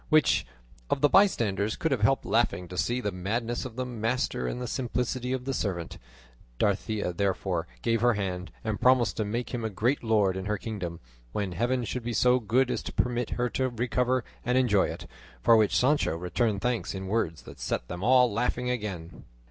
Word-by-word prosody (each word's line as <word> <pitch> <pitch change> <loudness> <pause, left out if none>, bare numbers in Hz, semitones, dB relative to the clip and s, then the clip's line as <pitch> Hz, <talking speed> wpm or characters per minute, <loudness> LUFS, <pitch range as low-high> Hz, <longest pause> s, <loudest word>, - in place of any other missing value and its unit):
Which 155 -1 +4 0.4
of - - 0
the 145 - +5
bystanders 110 - +3
could 160 - -1
have 130 -6 +1
helped 135 +5 +2
laughing 100 -6 +1
to 90 - -7
see 120 +8 0
the 105 - -1
madness 115 +7 -2
of 120 -3 -7
the 130 0 -2
master 115 - -1
and 95 - -3
the 125 - -3
simplicity 125 0 -2
of 130 -1 -2
the 135 - -1
servant? 90 -8 -3 0.6
Dorothea 105 0 0
therefore 95 -2 -1 0.2
gave 115 -1 +1
her 120 -1 +4
hand, 90 -3 -3
and 110 -2 -3
promised 125 -3 +4
to 110 - +1
make 120 +5 -3
him 120 -2 -2
a 110 - -1
great 115 +8 0
lord 105 -4 +2
in 95 - -4
her 105 0 -1
kingdom, 95 -6 -5 0.3
when 100 -3 -2
Heaven 120 +6 0
should 125 +2 -3
be 120 0 -3
so 125 +3 +4
good 125 +3 +2
as - - -1
to - - -6
permit 120 -1 0
her 125 0 +1
to 130 +1 0
recover 125 +1 0 0.2
and 125 +1 +1
enjoy 105 -7 +3
it, - - -7 0.4
for 115 - +7
which 110 -2 +3
Sancho 130 - +2
returned 100 +4 0
thanks 120 -4 -1
in 95 0 -5
words 95 -6 -1
that - - -12
set - - -2
them 90 +5 -6
all 125 -1 +5
laughing 125 +2 0
again. 100 -9 -5
115 Hz, 200 wpm, -28 LUFS, 100-125 Hz, 0.6 s, for